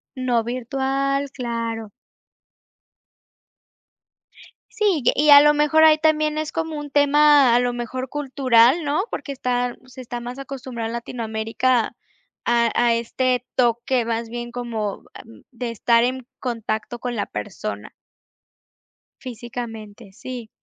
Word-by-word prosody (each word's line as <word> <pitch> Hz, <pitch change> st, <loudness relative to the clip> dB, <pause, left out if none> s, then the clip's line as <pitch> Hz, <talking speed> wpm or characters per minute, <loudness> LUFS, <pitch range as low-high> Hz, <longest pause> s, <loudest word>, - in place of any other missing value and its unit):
No 250 Hz, -3 st, 0 dB
virtual, 270 Hz, +3 st, -1 dB
claro. 230 Hz, -3 st, -4 dB, 2.8 s
Sí, 410 Hz, -8 st, +1 dB
ye -, -, +6 dB
y 300 Hz, +2 st, +2 dB
a 285 Hz, 0 st, +10 dB
lo 295 Hz, 0 st, +5 dB
mejor 300 Hz, +1 st, +3 dB
ahí 310 Hz, -1 st, +7 dB
también 310 Hz, -1 st, +1 dB
es 310 Hz, 0 st, -3 dB
como 320 Hz, -1 st, -3 dB
un 290 Hz, -1 st, -8 dB
tema 290 Hz, -2 st, +5 dB
a 245 Hz, -, +5 dB
lo 245 Hz, 0 st, 0 dB
mejor 250 Hz, +2 st, -4 dB
cultural, 265 Hz, 0 st, +3 dB
¿no?, 295 Hz, +6 st, +1 dB
porque 280 Hz, -, -5 dB
está 245 Hz, -2 st, -1 dB
se 255 Hz, 0 st, -14 dB
está 240 Hz, -1 st, -6 dB
más 245 Hz, +2 st, -7 dB
acostumbrado 260 Hz, -4 st, -6 dB
en 230 Hz, -, -5 dB
Latinoamérica 230 Hz, +1 st, -1 dB, 0.5 s
a 235 Hz, -1 st, +2 dB
a 240 Hz, -1 st, +4 dB
este 250 Hz, +1 st, -1 dB
toque 240 Hz, 0 st, +1 dB
más 230 Hz, 0 st, -2 dB
bien 240 Hz, 0 st, -6 dB
como, 230 Hz, -4 st, -4 dB
am, 225 Hz, -, -14 dB
de 245 Hz, -1 st, -5 dB
estar 230 Hz, +1 st, +3 dB
en 255 Hz, 0 st, -3 dB
contacto 225 Hz, -2 st, -4 dB
con 245 Hz, -1 st, -4 dB
la 205 Hz, -, -1 dB
persona. -, -, -6 dB, 1.3 s
Físicamente, 225 Hz, -4 st, -8 dB
sí. 240 Hz, +1 st, -8 dB
245 Hz, 130 wpm, -22 LUFS, 235-275 Hz, 2.8 s, a